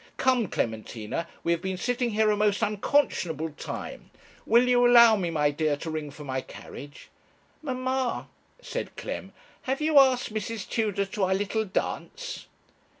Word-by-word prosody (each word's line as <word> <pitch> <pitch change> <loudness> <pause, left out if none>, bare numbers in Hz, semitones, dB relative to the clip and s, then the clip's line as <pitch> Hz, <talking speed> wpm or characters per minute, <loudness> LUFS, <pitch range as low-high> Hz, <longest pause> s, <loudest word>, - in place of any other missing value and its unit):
Come, 255 -4 +2
Clementina, 110 +6 -3 0.2
we 170 - +1
have 170 - +1
been 190 -1 -3
sitting 245 +3 0
here 215 0 +2
a - - +2
most 210 +1 +1
unconscionable 195 - +1
time. 145 - -7 0.4
Will 240 +2 +5
you 245 -1 +4
allow 235 -2 +8
me, 185 -4 -1
my 150 -3 +2
dear, 150 0 0
to 160 +2 -5
ring 155 -2 -4
for 145 +1 -10
my 130 -2 -2
carriage?' 145 +2 -11 0.5
'Mamma,' 260 -2 -2 0.3
said - - -5
Clem, - - -5 0.3
'have 265 +1 -2
you 305 -1 +5
asked 255 -4 +3
Mrs. 215 -1 -4
Tudor 210 -3 0
to 195 0 -1
our 190 +1 +1
little 205 +3 -1
dance?' 480 - -4
210 Hz, 155 wpm, -27 LUFS, 160-245 Hz, 0.5 s, allow